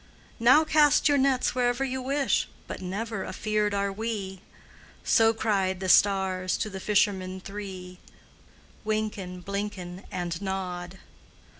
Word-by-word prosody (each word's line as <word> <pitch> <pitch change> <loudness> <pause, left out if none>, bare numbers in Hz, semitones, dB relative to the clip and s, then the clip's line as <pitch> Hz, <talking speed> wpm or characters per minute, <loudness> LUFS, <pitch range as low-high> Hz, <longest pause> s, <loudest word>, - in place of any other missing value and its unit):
"Now 255 +7 +6
cast 305 -2 +4
your 285 -1 +3
nets 265 -1 +2
wherever 245 +1 +1
you 260 0 -3
wish, 275 +2 +1 0.2
But - - -7
never 200 +2 -4
afeard 210 0 -1
are 200 0 0
we!" 200 -3 -4 0.6
So 225 -1 +4
cried 195 -4 0
the 190 -1 -3
stars 190 -2 +3
to 215 - -3
the 190 - -6
fishermen 190 -2 +1
three, 185 -2 -8 0.8
Wynken, 210 -4 -3
Blynken, 200 -2 -5
And 175 -2 -3
Nod. 185 -2 -4
200 Hz, 125 wpm, -27 LUFS, 185-225 Hz, 0.8 s, Now